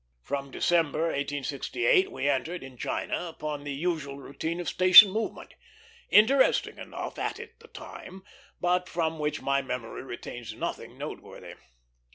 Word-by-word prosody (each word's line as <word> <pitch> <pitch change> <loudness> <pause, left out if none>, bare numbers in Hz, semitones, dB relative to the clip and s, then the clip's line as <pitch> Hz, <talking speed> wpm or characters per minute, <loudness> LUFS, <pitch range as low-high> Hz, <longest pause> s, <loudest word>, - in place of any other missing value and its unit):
From 140 0 -4
December, 160 0 +1
1868, 160 - 0
we 145 - -2
entered 155 +5 -1
in 130 -1 -11
China 175 +7 -3
upon 150 -3 -5
the 145 - -5
usual 145 -2 -3
routine 160 +5 -5
of 175 - -5
station 185 +2 +9
movement; 220 +3 -4 0.6
interesting 260 +6 +4
enough - - -7
at - - -2 0.2
the - - -16
time, 190 0 -11 0.4
but 180 0 +1
from 160 -2 -2
which 150 0 -2
my 140 0 +1
memory 125 -3 -5
retains 120 -3 -8
nothing - - -5
noteworthy. - - -8
155 Hz, 135 wpm, -28 LUFS, 140-180 Hz, 0.6 s, station